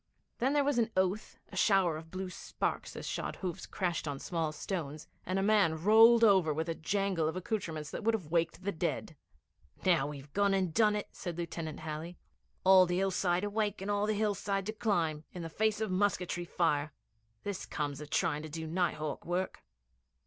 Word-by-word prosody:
Then 265 +4 +2
there 290 -1 +3
was 280 -3 +2
an 225 -1 +2
oath, 190 +3 0
a - - -11
shower 190 -6 +3
of 160 +1 -8
blue 185 +1 -5
sparks - - -3
as - - -6
shod - - -3
hooves 180 -4 -5
crashed 175 -4 -2
on 145 -1 -2
small 165 +1 -2
stones, 155 -2 -5 0.2
and 185 +1 0
a 195 - +1
man 200 -6 +4
rolled 225 +5 +7
over 190 -7 +5
with 160 +2 -2
a - - +1
jangle 190 -1 0
of 160 - -2
accoutrements 170 -6 -3
that - - -5
would 225 +1 +3
have 170 -8 -7
waked 170 +1 0
the 200 - 0
dead. 165 -2 -3 0.7
'Now 170 -7 +4
we've 145 -1 -9
gone 200 -1 +3
and 185 -4 0
done 210 0 +4
it,' 210 - -3
said 175 -3 -5
Lieutenant 165 -3 -5
Halley. 160 +3 -5 0.5
'All 185 -1 +7
the 175 0 0
hillside 185 -1 +1
awake, 205 0 -1
and 195 +2 -3
all 205 +1 +1
the 215 - +1
hillside 200 -2 0
to 215 - -3
climb 170 -9 0
in 180 - -6
the 165 - -5
face 215 +5 +1
of 220 -3 -1
musketry 185 -2 0
fire. 150 -4 0 0.5
This 200 -2 -4
comes 145 -1 -3
of 150 - -8
trying 150 -1 +1
to 155 - -7
do 160 +1 -5
night 175 +3 0
hawk 155 -1 -4
work.' 180 +2 -2
180 Hz, 200 wpm, -32 LUFS, 160-205 Hz, 0.7 s, rolled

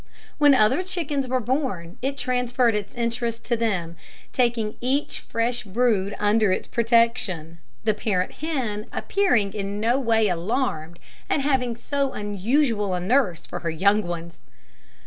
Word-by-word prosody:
When 290 -2 +7
other 215 +8 +4
chickens 310 -7 -2
were 255 +1 +1
born, 235 - -2
it 275 +2 -2
transferred 250 -2 +1
its 210 -1 -4
interest 235 -1 -2
to 240 - +1
them, 185 -8 -2 0.4
taking 235 -4 +1
each 265 +4 0
fresh 240 +1 -2
brood 205 -2 +1
under 210 -1 +3
its - - -1
protection 230 -8 +1 0.2
the 215 0 +2
parent 195 -3 -1
hen 250 -10 -2
appearing 245 - +1
in 200 -1 -3
no 235 +5 +2
way 225 -4 +3
alarmed 175 - -2 0.3
at 285 - +2
having 260 -4 +1
so 275 +3 -2
unusual 210 0 0
a - - -1
nurse 190 -2 +1
for 175 - -6
her 170 - -3
young 200 +6 +3
ones. 170 -3 -6
230 Hz, 145 wpm, -24 LUFS, 200-255 Hz, 0.4 s, When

